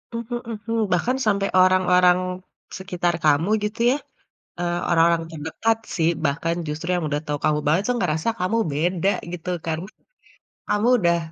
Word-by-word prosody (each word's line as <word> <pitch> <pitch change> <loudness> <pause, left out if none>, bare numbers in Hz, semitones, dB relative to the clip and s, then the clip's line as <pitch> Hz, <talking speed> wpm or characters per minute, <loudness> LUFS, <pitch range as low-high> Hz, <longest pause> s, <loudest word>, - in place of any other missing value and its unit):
Mhm 235 +1 -4
mhm, 225 +1 -4 0.2
bahkan 245 +9 +1
sampai 200 -2 +1
orang-orang 180 -1 +4 0.6
sekitar 180 -2 -1
kamu 155 +6 +3
gitu 210 +3 -3
ya, - - -1 0.6
eee, 175 0 -1
orang-orang 170 0 +4
terdekat 160 +9 -1 0.2
sih, 165 0 +3 0.2
bahkan 165 +4 -1
justru 155 +4 -5
yang 175 -3 -1
udah 145 0 -1
tahu 145 0 -2
kamu 150 -1 +2
banget 160 +6 +3
tuh, 245 - +1
ngerasa 160 +7 -1
kamu 210 +6 +1
beda 175 +6 +1 0.2
gitu 180 +1 -5 0.2
kan? 160 -1 -1 0.9
Kamu 210 +3 +2
udah 170 -3 +2
175 Hz, 150 wpm, -23 LUFS, 160-205 Hz, 0.9 s, orang-orang